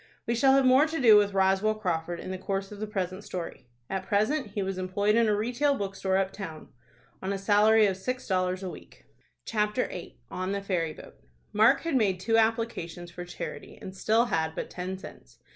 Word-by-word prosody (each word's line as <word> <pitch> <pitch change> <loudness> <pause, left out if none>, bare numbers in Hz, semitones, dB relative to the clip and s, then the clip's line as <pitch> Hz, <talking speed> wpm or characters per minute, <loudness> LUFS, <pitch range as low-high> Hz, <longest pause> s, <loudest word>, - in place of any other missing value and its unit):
We 235 - 0
shall 265 +3 +4
have 270 -1 +4
more 260 +4 +6
to 320 +1 -3
do 230 -5 +7
with 205 -1 +3
Roswell 195 +3 +3
Crawford 175 -4 -2
in 185 - -6
the 185 - -5
course 195 +1 -3
of 205 - -9
the 215 - -3
present 190 -2 -3
story. 170 -10 -7 0.2
At 190 -1 -4
present 215 +7 +1
he 205 - -1
was 190 -1 -3
employed 200 +3 +1
in 230 -1 +4
a 210 - +3
retail 245 +7 +1
bookstore 195 -3 -1
up 195 0 0
town, 165 -6 -8 0.5
on 190 - -2
a 200 - -1
salary 210 +2 +5
of 195 -2 +1
six 255 +7 -4
dollars 185 0 0
a 185 - -3
week. - - -14 0.4
CHAPTER 210 +2 0
VIII. 180 - -8
ON 185 +2 -3
THE 200 - -2
FERRY 170 -5 -1
BOAT. - - -14 0.3
Mark 220 +6 +5
had 330 -3 -2
made 200 -7 +2
two 225 +4 +1
applications 220 -7 -1
for 175 0 -7
charity, 175 - -7
and 190 - -9
still 220 +4 +2
had 160 -7 -1
but - - -5
ten 185 +1 -4
cents. 190 - -13
200 Hz, 210 wpm, -28 LUFS, 185-225 Hz, 0.5 s, do